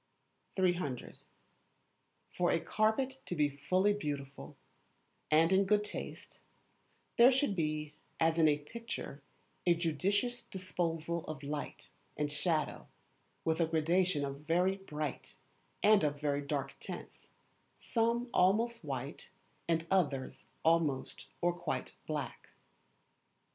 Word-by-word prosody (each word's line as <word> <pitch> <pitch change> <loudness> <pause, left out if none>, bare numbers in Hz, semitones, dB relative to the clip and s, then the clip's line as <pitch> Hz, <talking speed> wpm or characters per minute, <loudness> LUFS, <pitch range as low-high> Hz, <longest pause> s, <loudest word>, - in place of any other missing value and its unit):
300. 175 -9 0 1.1
For 175 -1 +1
a - - +3
Carpet 255 +8 0
to 175 - -2
be 145 -2 +1
really 190 +3 +5
Beautiful 145 -8 -5 0.7
and 165 +4 +5
in 190 +1 +5
good 210 +1 +3
taste, - - -6 0.8
there 245 +3 +9
should 265 -5 +2
be, 155 -2 -1 0.3
as 165 0 +3
in 160 - +6
a 150 -1 +4
picture, 225 -2 -6 0.5
a 175 - +6
judicious 195 +9 0
disposal 170 -3 -2
of 150 -3 -6
light 145 +1 -4 0.3
and 150 -1 0
shadow, 155 +2 -1 0.6
with 160 +1 +2
a 165 - +3
gradation 165 0 +2
of 140 0 -5
very 175 +5 +2
bright 155 -6 -5 0.5
and 210 -3 +6
of 145 -1 0
very 145 -1 0
dark 140 -1 -2
tints; - - -8 0.5
some 235 +1 0
almost 225 +4 +3
white, 135 -1 -5 0.4
and 165 -1 +1
others 145 -9 0 0.2
almost 160 -5 +1
or 175 0 +3
quite 175 -3 -3
black. 150 -3 -4
165 Hz, 115 wpm, -34 LUFS, 150-190 Hz, 1.1 s, there